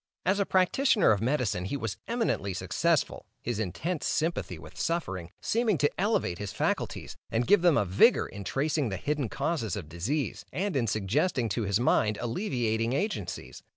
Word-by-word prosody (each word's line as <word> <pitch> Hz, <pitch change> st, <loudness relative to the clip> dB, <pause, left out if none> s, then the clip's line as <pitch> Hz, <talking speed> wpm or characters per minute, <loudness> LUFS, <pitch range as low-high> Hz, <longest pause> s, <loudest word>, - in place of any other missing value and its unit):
As 190 Hz, +3 st, +2 dB
a 200 Hz, -, +1 dB
practitioner 195 Hz, +4 st, +4 dB
of 105 Hz, -2 st, +2 dB
medicine, 115 Hz, -8 st, 0 dB
he 125 Hz, +9 st, -2 dB
was 110 Hz, -5 st, -4 dB
eminently 225 Hz, -, -1 dB
successful, -, -, 0 dB, 0.2 s
his -, -, -2 dB
intense 145 Hz, -, -2 dB
sympathy 165 Hz, +2 st, -1 dB
with -, -, -12 dB
suffering, 95 Hz, -, -2 dB
seeming 225 Hz, -4 st, +1 dB
to 145 Hz, +1 st, +2 dB
elevate 195 Hz, -, +1 dB
his 105 Hz, -2 st, -4 dB
faculties -, -, -2 dB
and 115 Hz, +2 st, 0 dB
give 205 Hz, +5 st, +5 dB
them 175 Hz, -4 st, +5 dB
unwonted 95 Hz, -2 st, -1 dB
vigor -, -, +6 dB
in 100 Hz, -, -8 dB
tracing 140 Hz, -, 0 dB
the 95 Hz, -, -3 dB
hidden 145 Hz, +2 st, -1 dB
causes 140 Hz, -6 st, -1 dB
of 90 Hz, -7 st, -6 dB
disease, 120 Hz, -, -2 dB
and 185 Hz, +5 st, -2 dB
in 120 Hz, -4 st, +1 dB
suggesting 115 Hz, -, +1 dB
to 105 Hz, +2 st, -1 dB
his 100 Hz, +1 st, +1 dB
mind 110 Hz, -3 st, +2 dB
alleviating 120 Hz, -, -1 dB
agencies. 205 Hz, +9 st, -3 dB
125 Hz, 170 wpm, -29 LUFS, 105-170 Hz, 0.2 s, vigor